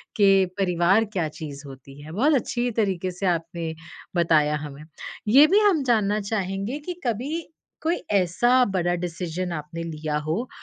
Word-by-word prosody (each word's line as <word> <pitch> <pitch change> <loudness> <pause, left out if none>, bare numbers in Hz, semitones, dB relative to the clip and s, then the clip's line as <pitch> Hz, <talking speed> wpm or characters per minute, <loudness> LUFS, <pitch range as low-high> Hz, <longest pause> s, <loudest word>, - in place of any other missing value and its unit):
कि 195 -3 +5
परिवार 185 +3 +3
क्या 175 -4 0
चीज़ 150 -2 -8
होती 135 +1 -12
है। 155 - -10
बहुत 265 - +2
अच्छी 245 0 -1
तरीके 185 -2 -1
से 180 +2 -5
आपने 165 -1 -2 0.4
बताया 155 -3 +3
हमें। 145 0 -8 0.4
ये 275 +8 +7
भी 395 +5 +4
हम 395 -9 +3
जानना 215 -4 +2
चाहेंगे 200 +5 -3
कि 360 - -3
कभी 280 +9 -2 0.3
कोई 330 +2 +1 0.2
ऐसा 240 +8 +3
बड़ा 175 -1 +1
डिसीज़न 175 0 -4
आपने 165 +1 -5
लिया 155 -2 -3
हो, 205 +11 -2
185 Hz, 155 wpm, -24 LUFS, 165-230 Hz, 0.4 s, ये